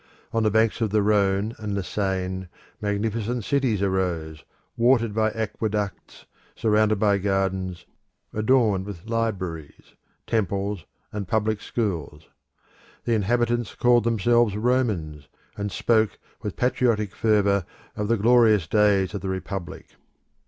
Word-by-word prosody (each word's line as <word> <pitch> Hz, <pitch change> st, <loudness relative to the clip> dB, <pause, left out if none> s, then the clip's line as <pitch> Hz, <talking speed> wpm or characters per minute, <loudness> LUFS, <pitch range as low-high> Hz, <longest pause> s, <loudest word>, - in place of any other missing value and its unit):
On 115 Hz, -, +2 dB
the 110 Hz, -, +3 dB
banks 110 Hz, +2 st, +2 dB
of 110 Hz, -, +1 dB
the 105 Hz, 0 st, +2 dB
Rhone 100 Hz, +1 st, +2 dB
and 105 Hz, -2 st, -3 dB
the 100 Hz, -, -2 dB
Seine 95 Hz, -1 st, -2 dB, 0.3 s
magnificent 110 Hz, +3 st, -1 dB
cities 125 Hz, -6 st, +1 dB
arose, 85 Hz, -5 st, -1 dB, 0.3 s
watered 115 Hz, -2 st, +3 dB
by 110 Hz, 0 st, +2 dB
aqueducts, 105 Hz, -2 st, -4 dB, 0.3 s
surrounded 110 Hz, -1 st, +2 dB
by 100 Hz, -1 st, +2 dB
gardens, 95 Hz, -2 st, -1 dB, 0.5 s
adorned 110 Hz, -4 st, +2 dB
with 95 Hz, -3 st, -8 dB
libraries, 95 Hz, -10 st, -4 dB, 0.3 s
temples, 100 Hz, -3 st, -1 dB, 0.3 s
and 105 Hz, -3 st, -4 dB
public 110 Hz, 0 st, 0 dB
schools. 85 Hz, -, -3 dB, 0.8 s
The 120 Hz, -, 0 dB
inhabitants 120 Hz, +1 st, 0 dB
called 120 Hz, -1 st, +4 dB
themselves 115 Hz, -1 st, +2 dB
Romans, 105 Hz, -, -1 dB, 0.3 s
and 100 Hz, 0 st, -4 dB
spoke 110 Hz, -2 st, +1 dB, 0.2 s
with 105 Hz, -, -4 dB
patriotic 115 Hz, -5 st, +1 dB
fervour 100 Hz, -3 st, +2 dB, 0.3 s
of 105 Hz, -, -2 dB
the 115 Hz, +1 st, +2 dB
glorious 110 Hz, -3 st, +4 dB
days 100 Hz, 0 st, +2 dB
of 100 Hz, -, -4 dB
the 95 Hz, -, -3 dB
Republic. 95 Hz, -2 st, -5 dB
105 Hz, 125 wpm, -24 LUFS, 95-115 Hz, 0.8 s, called